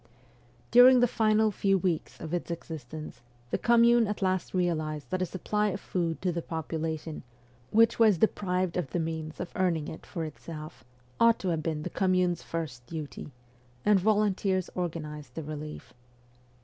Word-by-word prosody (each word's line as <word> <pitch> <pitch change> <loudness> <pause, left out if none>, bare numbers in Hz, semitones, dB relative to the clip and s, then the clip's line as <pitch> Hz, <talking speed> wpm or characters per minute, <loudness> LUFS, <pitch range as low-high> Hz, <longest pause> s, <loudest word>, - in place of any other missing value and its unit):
During 250 +1 +8
the 245 - +5
final 220 -1 +3
few 195 0 +2
weeks 180 -4 -2
of 160 +1 -6
its 175 - -2
existence, 160 -3 -7 0.3
the - - 0
Com 235 -1 +4
mune 235 -1 +5
at 210 -1 -3
last 185 -1 0
realized 155 -6 -1
that 185 - -1
a 185 - 0
supply 210 +4 -1
of 195 -1 -2
food 170 -4 -2
to 185 - +2
the 170 0 -3
popula 160 -1 -3
tion, 155 0 -7 0.5
which 230 +2 +4
was 215 -5 +6
deprived 185 -2 0
of 175 -7 -2
the 175 - -2
means 160 -1 -4
of - - -5
earning 165 -5 +1
it 160 - -9
for 165 -4 -4
itself, 155 -3 -9 0.4
ought 230 0 +6
to 190 - -3
have 165 -2 0
been 155 -1 -2
the - - -4
Commune's 185 -2 +1
first 155 -7 -5
duty, 155 -2 -7 0.5
and 210 -1 +5
volunteers 200 -2 +1
organized 155 -4 -5
the 160 - -4
relief. 150 0 -7
175 Hz, 170 wpm, -29 LUFS, 160-200 Hz, 0.5 s, During